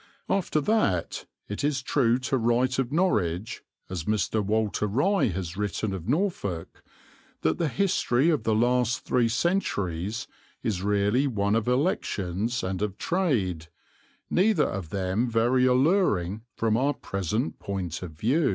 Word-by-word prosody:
After 185 -5 +1
that 140 - 0 0.2
it 105 - -4
is 140 -3 0
true 125 -4 +2
to 130 +1 -1
write 125 +3 +1
of 130 -1 -1
Norwich, 105 - 0 0.3
as 90 -4 -5
Mr. 105 0 0
Walter 105 0 0
Rye 145 - +2
has 90 -3 -4
written 105 0 -2
of 95 -3 -6
Norfolk, 125 - -2 0.6
that 80 - +1
the 165 - +1
history 165 -4 +2
of 155 - +1
the 110 - +1
last 120 +1 +1
three 120 -2 +2
centuries 110 - -1 0.4
is 100 -5 -1
really 105 +7 +2
one 100 -5 0
of 115 0 +1
elections 120 - 0
and 95 0 -3
of 105 -2 -2
trade, 110 - 0 0.6
neither 185 -3 +3
of 95 -4 -4
them 100 +6 -1
very 120 +3 +3
alluring 125 - +2
from 110 -1 +1
our 140 +4 +1
present 100 -2 -3
point 90 -4 -4
of 90 -4 -7
view. 125 - +1
115 Hz, 140 wpm, -26 LUFS, 95-135 Hz, 0.6 s, neither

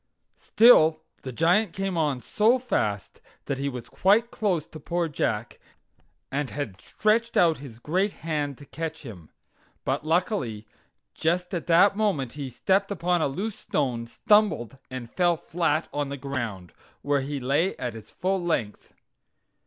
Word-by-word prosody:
Still 160 -9 +5 0.2
the 130 - -6
Giant 175 - +2
came 195 -1 -2
on 150 -6 0
so 220 - +3
fast 105 - -2 0.2
that 135 -1 -3
he 140 0 -1
was 125 -2 -7
quite 215 +5 +3
close 180 -8 0
to 155 - -11
poor 170 +3 -1
Jack, 150 - -2 0.7
and 140 -1 -1
had 110 -10 -5
stretched 230 +2 0
out 165 -4 +4
his 130 -5 -10
great 185 - 0
hand 145 -4 -2
to 145 - -13
catch 160 +3 -6
him. 95 - -10 0.6
But, - - -1
luckily, 155 - -1 0.5
just 180 +3 -1
at 175 - -3
that 180 +4 +5
moment 190 - 0
he 140 -3 -5
stepped 195 - +1
upon 175 -3 0
a - - +2
loose 195 +10 -4
stone, 120 -5 -1
stumbled, 140 - +2
and 130 -2 -6
fell 175 +5 +1
flat 165 -1 -1
on 145 -1 -2
the 140 - -5
ground, 120 - -5 0.3
where 145 -1 +1
he 140 +1 -4
lay 145 +9 +1
at 120 -2 -4
his 110 -1 -11
full 190 0 -1
length. 115 -12 -3
155 Hz, 155 wpm, -26 LUFS, 130-185 Hz, 0.7 s, Still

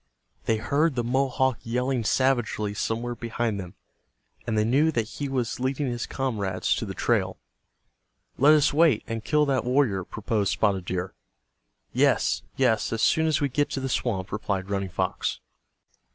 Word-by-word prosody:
They 110 - +2
heard 145 +7 +1
the 120 - 0
Mohawk 130 0 +1
yelling 125 +1 -1
savagely 120 -5 +1
somewhere 115 +3 -2
behind 115 -2 -2
them, 90 -2 -8 0.7
and 110 -2 0
they 105 - +3
knew 140 +8 +3
that 115 -7 -1
he 140 +4 -5
was 125 -4 -2
leading 135 +3 -1
his 120 -3 -3
comrades 105 -8 -1
to - - -3
the - - -6
trail. - - 0 1.0
"Let 150 +4 +7
us 150 -2 +3
wait, 155 -7 +4
and 115 -1 -4
kill 150 -1 +2
that 135 -2 +1
warrior," 125 -7 +1
proposed 105 0 -1
Spotted 95 -4 +1
Deer. 90 +1 -3 0.8
"Yes, - - +2
yes, 115 -5 +2
as 115 -1 -1
soon 160 0 +3
as 155 -1 +1
we 145 - +2
get 145 +2 0
to - - -3
the 135 0 -3
swamp," 100 -7 -1
replied 100 -2 -3
Running 95 -1 -1
Fox. 95 +1 -2
120 Hz, 165 wpm, -26 LUFS, 105-135 Hz, 1.0 s, Let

